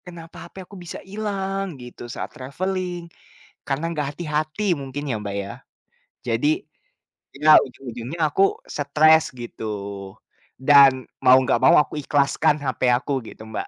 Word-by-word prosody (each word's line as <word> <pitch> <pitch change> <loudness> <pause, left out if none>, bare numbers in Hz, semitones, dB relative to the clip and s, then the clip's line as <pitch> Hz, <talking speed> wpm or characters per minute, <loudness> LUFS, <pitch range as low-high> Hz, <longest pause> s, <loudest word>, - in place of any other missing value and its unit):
kenapa 170 -1 -11
HP 190 0 -10
aku 200 - -14
bisa 175 - -8
hilang 195 -3 -4
gitu 120 -1 -10
saat - - -6
travelling, 180 +6 -4 0.6
karena 145 +4 -2
nggak 150 -3 -3
hati-hati 155 +3 -1
mungkin 140 +1 -6
ya, 120 - 0
Mbak, 100 -1 -5
ya, 100 - -7 0.7
jadi. 115 +5 +1 0.9
Iya, 150 +2 +3
ujung-ujungnya 125 +3 -8
aku 190 - +1 0.3
stres 155 +2 +4 0.2
gitu. 120 -1 -8 1.0
Dan 140 -1 +7 0.3
mau 130 0 +8
nggak 130 - +1
mau - - +7
aku 150 - -2
ikhlaskan 145 +2 +2
HP 130 - -3 0.2
aku 140 +3 -4 0.2
gitu, - - -12
Mbak. - - -4
150 Hz, 135 wpm, -22 LUFS, 130-175 Hz, 1.0 s, mau